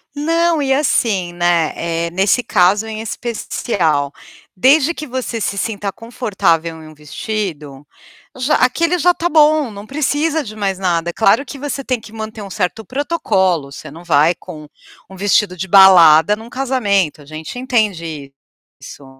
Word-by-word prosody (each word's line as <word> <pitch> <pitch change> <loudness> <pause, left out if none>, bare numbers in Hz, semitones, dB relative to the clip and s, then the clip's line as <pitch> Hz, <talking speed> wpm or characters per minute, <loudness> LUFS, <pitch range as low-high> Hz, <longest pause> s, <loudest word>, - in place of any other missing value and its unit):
Não, 330 +2 +1
e 270 -1 +1
assim, 215 -10 0
né, 175 -2 +1
eh, 170 0 -2
nesse 195 +7 +2
caso 205 0 +2
em 220 -1 -6
especial, 200 - -2 0.5
desde 280 - +4
que 305 -2 -7
você 255 -3 -4
se 200 - -2
sinta 200 -1 -3
confortável 170 -8 -2
em 155 - -12
um 155 - -14
vestido, 150 -2 -6 0.5
já 255 +3 0
aquele 335 +8 +1
já 355 +2 +3
tá 345 0 -2
bom, 305 -3 +4
não 205 -1 -10
precisa 300 +4 -1
de 215 -4 -9
mais 195 -3 -2
nada. 175 -2 -1
É - - -25
claro 225 +7 +2
que 280 +1 -9
você 280 -1 -4
tem 255 -3 -2
que 220 - -13
manter 220 0 -7
um 200 - -8
certo 195 +2 -3
protocolo, 190 - -1
você 145 +1 -10
não 165 +4 -12
vai 160 0 +3
com 155 -3 -11 0.4
um 190 - -13
vestido 200 0 +1
de 185 +2 -5
balada 180 -2 +7
num 225 +2 -12
casamento, 210 - -1
a - - -15
gente 155 +9 -8
entende 170 - -2 0.5
isso. 140 - -11
205 Hz, 165 wpm, -17 LUFS, 170-255 Hz, 0.5 s, balada